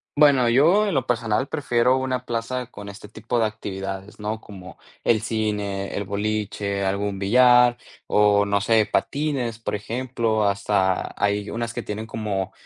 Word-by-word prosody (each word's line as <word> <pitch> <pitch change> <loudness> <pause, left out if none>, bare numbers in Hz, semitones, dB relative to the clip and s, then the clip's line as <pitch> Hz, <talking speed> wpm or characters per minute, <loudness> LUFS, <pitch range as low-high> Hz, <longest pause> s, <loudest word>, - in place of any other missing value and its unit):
Bueno 140 -5 +5
yo, 170 - +4
en 195 - -1
lo 130 -2 +1
personal, 115 0 0
prefiero 130 -4 +1
una 130 -1 -2
plaza 120 +2 -3
con 100 0 -9
este 100 +1 -10
tipo 110 +3 -4
de 115 - +3
actividades, 95 -2 -6
¿no?, 110 +1 -4
como, 95 -3 -12 0.2
el 110 -2 +3
cine, 105 -3 -2
el 100 - -3
boliche, 100 -1 -2
algún 100 0 -1
billar, 125 +3 +5 0.3
o, 105 -1 +4
no 100 0 +2
sé, 110 +1 +3
patines, 135 -6 -1
por 115 - -3
ejemplo. 115 0 -1
Hasta, 100 -2 0
hay 100 0 0
unas 115 0 -3
que - - -3
tienen 110 +2 -5
como, 100 -4 -3
110 Hz, 155 wpm, -23 LUFS, 100-120 Hz, 0.3 s, Bueno